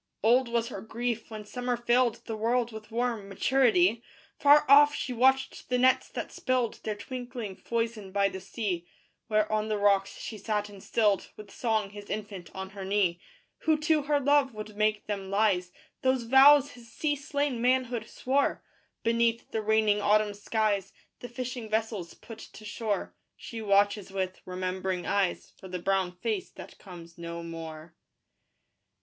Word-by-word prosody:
Old 245 +3 +4
was 235 0 -1
her 195 - -6
grief 235 +2 -3
when 215 -1 -7
summer 245 +2 -2
filled 240 0 +1
The 225 - -4
world 235 +2 0
with 215 -1 -10
warm 230 -3 -2
maturity: 225 -1 +3 0.4
Far 290 +1 +6
off 290 +1 +7
she 255 - -3
watched 265 +2 +2
the 250 - +2
nets 255 +1 +3
that - - -5
spilled 255 -3 -1
Their 215 - -2
twinkling 245 -2 -6
foison 230 -4 -3
by 200 0 +2
the 190 -1 -6
sea: 185 -4 -3 0.4
Where 215 -1 +2
on 215 0 0
the 215 -1 0
rocks 200 -1 +2
she 215 - -7
sat 210 0 -2
and 200 -2 -12
stilled 210 -3 +1
With 210 -2 -11
song 220 -4 -1
his 205 0 -10
infant 205 -4 -5
on 190 0 -6
her 195 -1 -7
knee. 190 -3 +1 0.4
Who 315 -1 +2
to 310 -1 +3
her 290 0 +1
love 280 -3 +3
would 215 0 -7
make 215 0 +1
them 200 -2 -4
lies 195 -3 +1 0.3
Those 260 -1 +2
vows 275 +3 +7
his 235 -2 -15
sea 290 +4 0
slain 285 -3 -2
manhood 245 -2 +1
swore? 275 +2 0 0.4
Beneath 230 0 +1
the 220 - -1
raining 215 -1 +2
autumn 210 0 +3
skies 205 -1 -1 0.3
The 245 - -8
fishing 245 -2 -5
vessels 215 -5 -2
put 225 -1 -11
to 215 - -12
shore: 210 -1 -3 0.2
She 230 -4 -8
watches 205 -1 +2
with 190 -1 -3
remembering 185 0 -3
eyes 195 -3 -1
For 190 - -10
the 180 0 -4
brown 190 0 0
face 205 +2 -3
that - - -12
comes 170 -3 -12
no 170 0 -6
more. 165 -1 -8
215 Hz, 165 wpm, -28 LUFS, 195-245 Hz, 0.4 s, off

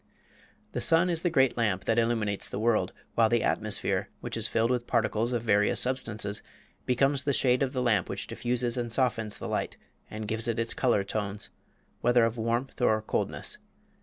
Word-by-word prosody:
The - - -3
sun 170 +2 +4
is 165 -1 -1
the 175 - +1
great 135 -5 +2
lamp 100 -5 0
that 115 +1 +2
illuminates 110 -3 0
the - - -5
world, 110 +1 +1 0.2
while 115 -1 +4
the 120 -1 +2
atmosphere, 105 -1 0
which - - -5
is - - 0
filled 115 +2 +1
with 125 -1 -1
particles 115 0 +1
of 120 -2 -1
various 105 -2 +2
substances, 110 -5 -1 0.5
becomes 135 +2 +2
the 140 - +1
shade 125 -1 +3
of 135 -2 +1
the 130 -1 -1
lamp 105 -6 +2
which - - -3
diffuses 120 0 -2
and 120 -1 -2
softens 115 -4 0
the - - -6
light - - -2 0.3
and 110 0 -6
gives 110 +2 -1
it 115 -1 -1
its 115 0 0
color 120 -6 +2
tones, 105 0 -4 0.5
whether 120 0 +4
of 115 +1 -2
warmth 120 +4 -2
or 110 -3 +3
coldness. - - -2
115 Hz, 190 wpm, -28 LUFS, 110-125 Hz, 0.5 s, sun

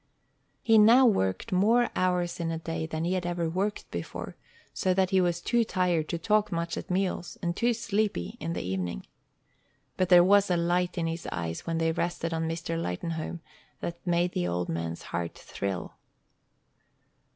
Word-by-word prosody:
He 225 -1 +6
now 235 +5 +7
worked 95 - +1
more 225 +6 +3
hours 180 -1 0
in 165 -1 -1
a 165 - -2
day 165 0 -4
than 160 0 -3
he 180 - 0
had 185 -1 -1
ever 175 -1 -1
worked 195 +5 -2
before, - - -6 0.4
so 185 -2 +1
that 190 -1 +2
he 190 -1 +4
was 175 -1 0
too 235 +5 +2
tired 180 -6 0
to 170 - -1
talk 210 +4 +1
much 170 0 -2
at - - -6
meals, 185 -1 -1
and 170 0 -1
too 240 +3 +2
sleepy 210 - -1
in 165 +2 -3
the - - -3
evening. 90 -8 -3 0.9
But 185 -1 +1
there 175 -1 +8
was 200 +2 +5
a 175 - +2
light 175 +2 0
in 170 - 0
his 165 +1 -4
eyes 85 -1 -4
when 165 0 0
they 165 0 +2
rested 170 0 -2
on 160 0 -1
Mr. 165 0 -3
Lightenhome 160 - -4 0.4
that 170 0 -5
made 175 0 +2
the 90 - -1
old 85 0 -2
man's 85 0 -3
heart 85 -1 -3
thrill. 95 -2 -4
170 Hz, 180 wpm, -28 LUFS, 160-185 Hz, 0.9 s, there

